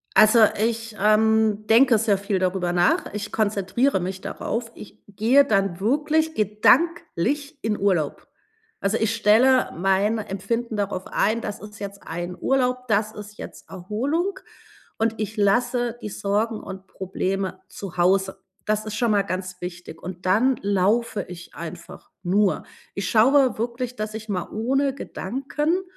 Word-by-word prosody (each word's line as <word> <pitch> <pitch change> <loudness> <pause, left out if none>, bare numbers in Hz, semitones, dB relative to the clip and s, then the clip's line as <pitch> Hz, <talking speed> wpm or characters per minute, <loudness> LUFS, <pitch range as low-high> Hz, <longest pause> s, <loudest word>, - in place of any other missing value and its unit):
Also, 215 +2 +7 0.2
ich, 225 0 -1
ähm, 215 0 +3
denke 235 +1 +6
sehr 210 -2 +2
viel 200 0 -1
darüber 185 -1 0
nach. 175 +2 +2
Ich 210 0 -5
konzentriere 205 +2 +1
mich 185 +2 -4
darauf. 230 +4 -4
Ich 210 - -12
gehe 225 +8 +4
dann 195 -6 +1
wirklich 300 +8 +1
gedanklich 285 - +1
in 215 -1 -1
Urlaub. 180 -7 0 0.5
Also, 200 +3 +1
ich 220 0 0
stelle 230 +4 +4
mein 195 +5 +2
Empfinden 220 +3 -3
darauf 200 -2 -3
ein, 220 +3 +1
das 205 -2 -6
ist 210 -1 -11
jetzt 200 -1 -7
ein 175 +2 -5
Urlaub, 250 +2 0
das 215 +1 +1
ist 210 0 -10
jetzt - - -10
Erholung 265 - -2 0.6
und 225 0 0
ich 215 +1 -4
lasse 240 +4 +1
die 210 - -5
Sorgen 210 +3 -1
und 190 0 -9
Probleme 190 0 -3
zu 195 -3 -8
Hause. 190 +2 +1 0.2
Das 215 0 0
ist 215 -1 -5
schon 235 0 +1
mal 205 -1 +3
ganz 185 -1 -5
wichtig, 175 -2 -8
und 180 +1 -8
dann 230 +8 +3
laufe 205 +3 +1
ich 175 -1 -11
einfach 170 +1 -9
nur. 195 +2 +1 0.3
Ich 195 -2 -2
schaue 260 +4 +4
wirklich, 240 +2 -3
dass 215 -2 -4
ich 220 0 -7
mal 185 -4 -3
ohne 270 +5 0
Gedanken 280 - -2
210 Hz, 150 wpm, -23 LUFS, 190-235 Hz, 0.6 s, Also